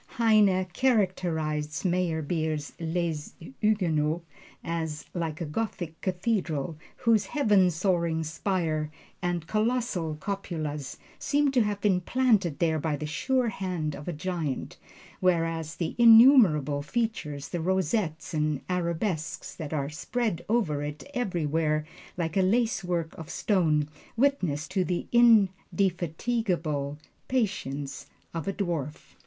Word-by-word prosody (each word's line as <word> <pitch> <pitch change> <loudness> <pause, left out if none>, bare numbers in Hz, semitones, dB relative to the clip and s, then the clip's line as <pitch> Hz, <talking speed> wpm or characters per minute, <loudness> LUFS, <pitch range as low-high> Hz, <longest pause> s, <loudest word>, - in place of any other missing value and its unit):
Heine 210 -5 +4
characterized 165 - 0
Meyerbeer's 160 -4 -1
"Les 165 -2 -2 0.2
Huguenots" 170 -6 +1 0.4
as 160 -2 -3
"like 165 -3 -3
a - - -1
Gothic 165 -1 -4
cathedral 180 -6 -1 0.2
whose 225 -5 +2
heaven 205 -10 +4
soaring 170 -2 0
spire 160 -2 -1 0.3
and 175 -2 -1
colossal 215 -6 0
cupolas 155 -6 -4 0.2
seem 290 0 +2
to 255 -2 +3
have 205 -2 -1
been 190 -3 +2
planted 210 - +2
there 160 -2 +1
by 150 0 -1
the 150 +1 -5
sure 250 - 0
hand 180 -7 -3
of 145 - -10
a - - -1
giant; 160 -3 -3 0.4
whereas 165 -3 +1
the 165 -2 -2
innumerable 225 - +7
features, 150 - -3
the 175 - -3
rosettes 180 -2 -1
and 150 -3 0
arabesques 170 -1 -2
that 155 -4 -7
are 145 -2 -2
spread 185 +2 -2
over 190 -11 +1
it 145 +1 -5
everywhere 160 - 0 0.3
like 165 -3 -2
a 195 - +4
lacework 185 -6 0
of 160 0 -8
stone, 160 -6 +1 0.3
witness 185 - +1
to 190 0 0
the 180 0 -2
indefatigable 185 -7 +2 0.3
patience 145 - -2 0.3
of 165 0 -4
a 195 - 0
dwarf." 165 -8 -4
175 Hz, 115 wpm, -28 LUFS, 155-205 Hz, 0.4 s, innumerable